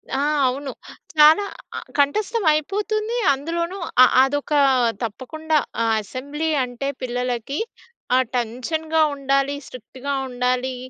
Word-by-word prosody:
ఆ! - - 0 0.3
అవును. 270 +2 -3 0.4
చాలా 310 +6 +6 0.3
అ - - -2 0.2
కంఠస్తం 420 +10 +1
అయిపోతుంది. 425 +8 -1 0.2
అందులోనూ 335 +6 -3 0.3
అ - - +10 0.2
అదొక 290 +2 -1 0.5
తప్పకుండా 310 +8 -2 0.4
అసెంబ్లీ 285 +9 -4
అంటే 250 +2 -4
పిల్లలకి 250 +2 -3 0.6
ఆ - - +5 0.2
టెన్షన్‌గ 255 +7 -3 0.2
ఉండాలి, 275 0 0
స్ట్రిక్ట్‌గా 260 +3 -7
ఉండాలి, 250 +1 -1
280 Hz, 100 wpm, -22 LUFS, 255-315 Hz, 0.6 s, అ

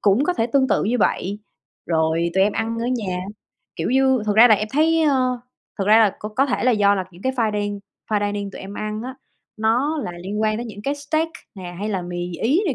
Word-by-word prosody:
cũng 210 +7 +3
có 360 - +1
thể 225 -10 0
tương 265 +2 +2
tự - - +2
như 240 +5 0
vậy, 200 -2 0 0.5
rồi 165 +1 +1
tụi 190 - +4
em 205 - +1
ăn 225 +1 -2
ở 235 - -2
nhà. 215 -8 -2 0.6
Kiểu - - -2
như, 265 -2 +3
thật 210 - +1
ra 235 +2 +9
là 220 - +7
em 215 +1 -3
thấy 320 +3 +3
ơ 255 -4 +1 0.4
thật 195 - 0
ra 215 +2 +7
là 220 -3 +5
c - - -20 0.2
có 270 +2 +4
thể 250 -1 +2
do 205 -1 +4
là 190 -2 -2
những 175 +1 -16
cái 260 - 0
finding 210 -4 -1 0.3
fine 205 -1 +1
dining 200 -1 -4
tụi - - -10
em 195 +1 -8
ăn 215 +1 -4
á, 260 +1 -6 0.4
nó 245 +8 +1
là 175 - -5
liên 205 +3 -3
quan 215 0 +1
đến 240 +2 -4
những 210 -2 -9
cái 280 +4 -1
steak 310 +3 -1 0.3
nè, 180 -3 -8
hay 200 -3 -2
mì 175 0 -4
Ý 290 - +3
này 295 - 0
220 Hz, 240 wpm, -22 LUFS, 200-260 Hz, 0.6 s, ra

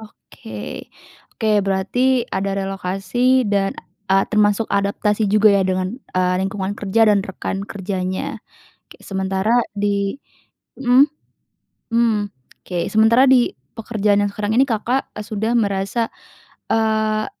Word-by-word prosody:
Oke, 110 - -10 0.5
oke 220 - 0
berarti 235 +6 +1
ada 195 +1 -1
relokasi, 195 +7 0
dan, 200 -2 0 0.3
eee, 195 0 +4
termasuk 210 +1 +3
adaptasi 205 +1 +1
juga 210 0 +5
ya 200 - +3
dengan, 185 +6 -2 0.2
eee, 180 0 +2
lingkungan 195 0 -2
kerja 205 +2 +2
dan 210 -2 +4
rekan 195 0 -5
kerjanya. 190 -2 -4 0.5
Kayak - - -16
sementara 190 +3 0 0.2
di 200 +3 -1 0.6
mhm. 255 +1 +5 0.9
Hmm, 225 -3 +1 0.3
oke. 175 -2 -3
Sementara 225 +4 +5
di 255 -2 +5 0.3
pekerjaan 210 -3 +1
yang 205 - 0
sekarang 210 +1 -2
ini 260 - +6
Kakak, 245 +3 -1
eee, 210 - -6
sudah 220 +2 -2
merasa, 200 +2 0 0.6
eee, 220 -1 +1
205 Hz, 120 wpm, -20 LUFS, 195-225 Hz, 0.9 s, ini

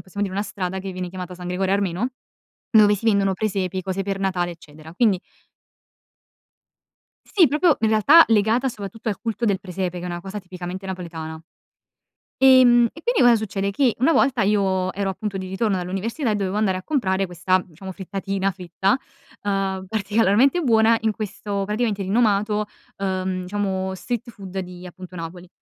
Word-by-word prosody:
possiamo 200 +2 -3
dire, 190 - -6
una 205 - +1
strada 190 -1 -4
che 190 0 -6
viene 180 -1 -5
chiamata 180 0 -7
San 180 0 -7
Gregorio 190 +2 0
Armeno, 200 +4 -1 0.6
dove 210 -2 +6
si 215 +3 -8
vendono 200 -3 +3
presepi, 190 -2 -2
cose 190 +1 -3
per 195 0 -3
Natale, 180 -2 -1
eccetera, 155 -1 -13
quindi 205 -2 +3 2.2
Sì, 355 -7 +6
proprio 305 +1 +3
in 220 - +2
realtà 250 +10 +7
legata, 225 +4 +3
soprattutto, 220 0 -6
al 205 - -2
culto 230 0 -3
del 200 -4 +2
presepe, 185 -2 -4
che 175 - -7
è - - -3
una 175 -1 -4
cosa 195 +3 -6
tipicamente 185 0 -7
napoletana. 165 -4 -6 1.0
Ehm, 250 -3 +6
e 320 - -12
quindi 485 -2 +2
cosa 245 -1 +7
succede? 200 -2 -2
Che 250 +2 +2
una 300 +6 +4
volta 265 -5 +3
io 190 -2 +1
ero 200 0 -1
appunto 195 +1 -4
di 185 - -5
ritorno 195 +2 0
dall'università 195 - -2
e - - +1
dovevo 195 -1 -2
andare 200 -3 +1
a 185 - -8
comprare 195 -10 0
questa, 180 +1 +1
diciamo, 185 +3 -10
frittatina 195 +1 -3
fritta, 185 +3 0 0.4
uhm 195 -2 -1
particolarmente 220 - +2
buona, 230 -3 +4
in 220 -1 +1
questo 205 -1 -4
praticamente 210 0 -1
rinomato, 210 +1 +1 0.3
uhm, 185 -1 -2
diciamo 190 -1 -2
street 240 +4 -4
food 195 -3 -7
di 180 -1 -8
appunto 185 +1 -11
Napoli. 175 +1 -7
195 Hz, 170 wpm, -22 LUFS, 185-220 Hz, 2.2 s, realtà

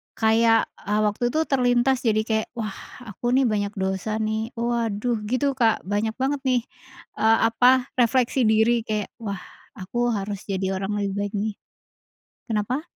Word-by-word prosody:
kayak, 225 0 +3
eee, 210 +1 -1
waktu 210 +3 -1
itu 275 +6 0
terlintas 250 -2 +2
jadi 215 0 +3
kayak 220 -1 -1
wah 215 -3 -3 0.3
aku 240 +3 -2
nih 270 - +4
banyak 205 -1 -1
dosa 190 +2 -2
nih 220 0 -1
waduh 235 -1 -1
gitu 255 +5 +1
Kak 225 -3 +3
banyak 205 +3 -1
banget 270 +2 -1
nih, 255 -1 +3 0.6
eee, 225 +1 +5
apa 245 +2 +3 0.3
refleksi 245 0 +3
diri 220 +2 +4
kayak 210 -2 -2
wah 200 -4 -5 0.3
aku 240 +4 -2
harus 200 0 -4
jadi 190 -1 -1
orang 195 +2 -3
lebih 200 -1 -2
baik 205 +1 -3
nih. 210 +1 -1 1.0
Kenapa? 225 +6 -1
220 Hz, 155 wpm, -24 LUFS, 205-240 Hz, 1.0 s, eee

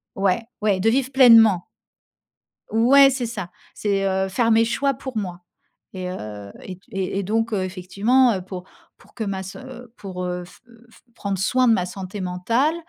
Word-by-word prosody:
ouais, 195 +3 +1 0.2
ouais, 205 -3 +1
de 220 +4 +3
vivre 265 +2 0
pleinement. 225 -8 +6 1.1
Ouais, 270 +5 +6
c'est 255 -2 -2
ça, 205 -6 -6 0.2
c'est, 200 -2 -1
heu, 190 0 0
faire 230 +4 +1
mes 225 0 +5
choix 275 +4 0
pour 265 -2 -8
moi 180 -4 -4 0.5
et 185 -1 -5
heu 105 - -8
et 185 -1 -8
et 195 0 -3
et - - -3
donc, 225 +3 -1
heu, 195 -3 0
effectivement, 200 +7 +2
heu, 185 - -4
pour 180 -1 -8 0.3
pour - - -22
que 225 - -4
ma 195 -1 -3
s 190 0 -8 0.4
pour, 180 -2 -6
heu, 180 0 -4
f - - -17 0.3
f - - -21
prendre 200 -3 -3
soin 255 +6 +2
de 225 - +6
ma 180 -3 0
santé 190 +2 -7
mentale, 230 - 0
200 Hz, 180 wpm, -22 LUFS, 185-230 Hz, 1.1 s, pleinement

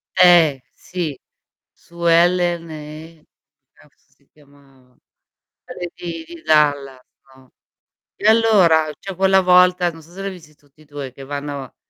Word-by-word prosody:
Eh, 170 -7 +5
sì, 165 -7 -6 0.5
Suellen 170 0 0
e, 155 +1 -11 0.5
cazzo - - -27
si - - -35
chiamava? 140 -3 -25 0.7
Quelli 175 -1 -8
di 165 -2 -7
di 170 -1 -13
Dallas, 145 -4 +1 0.3
no, 130 -1 -22 0.6
e - - -2
allora, 190 -9 +4
c'è 195 -1 -8
quella 190 +1 +3
volta, 180 -1 +4
non 165 0 -14
so 165 +3 -20
se 195 +2 -10
l'hai 195 0 -4
visti 160 -5 -15
tutti 145 +1 -28
e - - -20
2, 145 -3 -8
che 135 +2 -13
vanno 140 -2 -7
160 Hz, 135 wpm, -19 LUFS, 145-175 Hz, 0.7 s, Eh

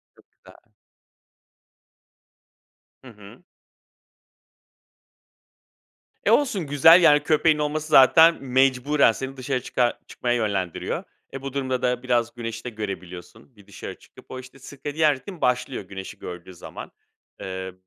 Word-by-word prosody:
Çok - - -26
güzel. - - -20 2.5
Hı - - -13
hı. 105 +2 -15 2.8
E, - - +3
olsun 210 - +1
güzel, 160 +5 +6
yani, 150 -3 +5
köpeğin 155 +1 +2
olması 150 +1 -2
zaten 160 +3 +6
mecburen 130 +1 +3
seni 135 +4 -7
dışarı 130 0 -2
çıkar 120 0 -1
çıkmaya 120 -1 -2
yönlendiriyor. 100 -7 -2 0.3
E, 135 - -6
bu 135 -1 -6
durumda 130 -2 -2
da 125 0 -1
biraz 120 -2 0
güneşi 115 -1 -6
de 125 - -5
görebiliyorsun 100 +2 -9
bir 100 -2 -20
dışarı 100 - -9
çıkıp. - - -18
O, 130 - -6
işte, 130 +1 -14
sirkadiyen 145 +3 -1
ritim 165 +6 -11
başlıyor 125 -1 -1
güneşi 95 0 -9
gördüğü 90 +1 -9
zaman. 85 - -10 0.5
Eee, 95 0 -6
130 Hz, 125 wpm, -23 LUFS, 110-145 Hz, 2.8 s, güzel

